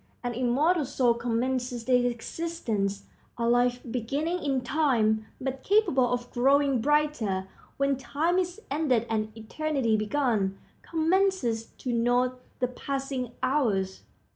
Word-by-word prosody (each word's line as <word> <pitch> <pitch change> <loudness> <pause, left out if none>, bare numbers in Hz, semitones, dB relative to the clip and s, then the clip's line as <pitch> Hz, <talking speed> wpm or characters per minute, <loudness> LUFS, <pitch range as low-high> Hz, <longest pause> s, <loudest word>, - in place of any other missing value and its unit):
An 245 0 -2
immortal 275 +8 +2
soul 255 -3 +2
commences 245 +1 -1
its 245 -1 +4
existence. 225 -7 -3 0.3
A 235 0 0
life, 245 +1 +3
beginning 285 +9 -1
in 270 -3 +1
time, 235 -6 +1
but 265 0 -3
capable 275 - +3
of 245 0 -2
growing 275 0 +3
brighter 250 -10 +1 0.3
when 275 -1 +1
time 320 +7 0
is 360 +2 -2
ended 275 -6 +2
and 215 -1 -1
eternity 260 0 -1
begun, 215 -4 0 0.2
commences 325 - +1
to 250 - -3
note 245 +2 +1 0.2
the 250 - +1
passing 265 -1 -4
hours. 220 -9 +1
250 Hz, 120 wpm, -28 LUFS, 235-290 Hz, 0.3 s, its